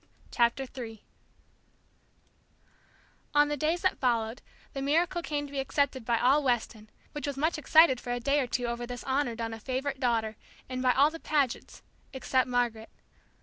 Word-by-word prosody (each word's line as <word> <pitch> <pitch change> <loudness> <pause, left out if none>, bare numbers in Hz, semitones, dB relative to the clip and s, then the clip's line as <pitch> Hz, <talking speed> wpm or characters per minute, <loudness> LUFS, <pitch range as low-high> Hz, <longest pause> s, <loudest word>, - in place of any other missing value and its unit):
CHAPTER 235 +3 +2
III 225 -4 -7 2.3
On 295 0 +5
the 295 - 0
days 315 +4 0
that 375 - +1
followed, 235 -2 0 0.3
the 275 - -4
miracle 335 +5 +1
came 295 -3 -3
to 285 - -11
be 280 - -3
accepted 270 -2 0
by 235 0 +2
all 265 +6 +4
Weston, 230 -4 -1 0.2
which 295 0 -5
was 280 -1 -3
much 310 +2 0
excited 310 -4 +5
for 245 - -5
a 245 - -1
day 280 +4 +2
or 260 - 0
two 245 0 -1
over 235 0 -3
this 245 0 -6
honor 265 -3 0
done 225 -1 -4
a 225 - -7
favorite 265 +3 -3
daughter, 225 -4 0 0.3
and 255 0 -4
by 255 -1 +4
all 285 +3 +4
the 330 - -8
Pagets, 285 -7 -1 0.3
except 260 -1 +1
Margaret. 240 -3 -1
260 Hz, 175 wpm, -29 LUFS, 240-290 Hz, 2.3 s, On